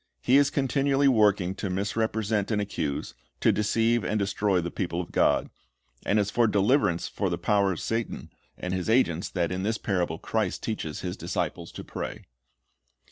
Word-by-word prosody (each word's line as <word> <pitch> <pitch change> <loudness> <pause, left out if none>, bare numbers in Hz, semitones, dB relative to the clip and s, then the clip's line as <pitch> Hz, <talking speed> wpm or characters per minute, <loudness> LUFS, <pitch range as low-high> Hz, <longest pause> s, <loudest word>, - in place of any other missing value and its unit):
^ - - -25
He 130 +2 +6
is 140 0 +4
continually 140 0 +2
working 105 -7 +3
to 95 0 -4
misrepresent 105 +2 -1
and 110 -2 +1
accuse, 80 -8 -3 0.3
to - - +4
deceive 115 +2 +1
and 110 - 0
destroy 100 -1 +1
the 85 0 -3
people 85 -2 -2
of 90 - -5
God. - - +2 0.6
And 100 - +3
it 105 - +4
is 100 - -5
for 120 -1 +3
deliverance 100 - +2
from - - -2
the - - -1
power 100 -2 +2
of 85 - -4
Satan 115 0 -3 0.3
and 90 0 -4
his 95 +2 -2
agents 95 -8 +2
that 85 -2 -1
in 90 0 -2
this 110 +3 0
parable 90 -6 -1
Christ 105 0 -2
teaches 80 -9 -4
His 90 -1 -4
disciples - - -3
to - - -7
pray. - - -6
105 Hz, 185 wpm, -27 LUFS, 90-115 Hz, 0.6 s, He